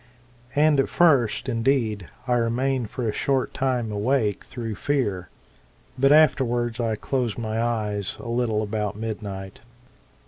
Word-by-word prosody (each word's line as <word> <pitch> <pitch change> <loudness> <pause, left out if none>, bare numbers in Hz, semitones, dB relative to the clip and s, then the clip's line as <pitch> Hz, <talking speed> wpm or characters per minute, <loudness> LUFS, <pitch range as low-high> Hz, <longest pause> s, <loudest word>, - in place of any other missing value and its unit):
And 150 0 +4
at 135 - +2
first, 140 -10 +3
indeed, 115 -5 0 0.2
I 125 - +2
remained 120 +1 0
for 125 -3 -3
a - - +1
short 135 +2 0
time 125 -4 -1
awake 105 0 0
through 115 -3 -5
fear; 105 -6 -1 0.7
but 135 +2 +3
afterwards 125 -6 +3
I 115 -2 0
closed 125 -1 -2
my 110 -1 -2
eyes 105 -4 -2
a - - -8
little 115 -3 0
about 105 -1 -2
midnight. 100 -3 -6
115 Hz, 135 wpm, -24 LUFS, 105-130 Hz, 0.7 s, And